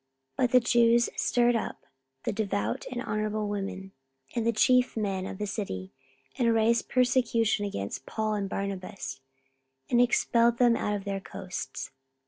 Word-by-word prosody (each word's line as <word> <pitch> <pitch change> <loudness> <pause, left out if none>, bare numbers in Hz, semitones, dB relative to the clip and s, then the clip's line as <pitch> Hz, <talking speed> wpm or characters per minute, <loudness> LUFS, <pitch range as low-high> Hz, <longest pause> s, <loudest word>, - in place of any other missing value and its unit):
44:013:050 - - -46
But 250 -2 +2
the 250 - +8
Jews 235 0 +4
stirred 240 0 +2
up 225 - -4 0.4
the - - -1
devout 205 -1 -2
and 245 0 -3
honourable 215 -1 -1
women, 195 -1 -4 0.4
and 230 -1 -1
the - - +4
chief 250 +2 +3
men 195 -3 -1
of - - -6
the 210 - -2
city, 140 - -4 0.5
and 230 -2 +3
raised 225 +1 +2
persecution 240 -4 +2
against 100 - -5
Paul 215 -1 -1
and 200 -2 -2
Barnabas, 190 -9 -5 0.7
and 240 - +5
expelled 235 -1 +3
them 240 -1 +5
out 210 -2 -1
of 200 - -5
their 200 -1 -3
coasts. 185 -1 -6
215 Hz, 155 wpm, -28 LUFS, 200-235 Hz, 0.7 s, the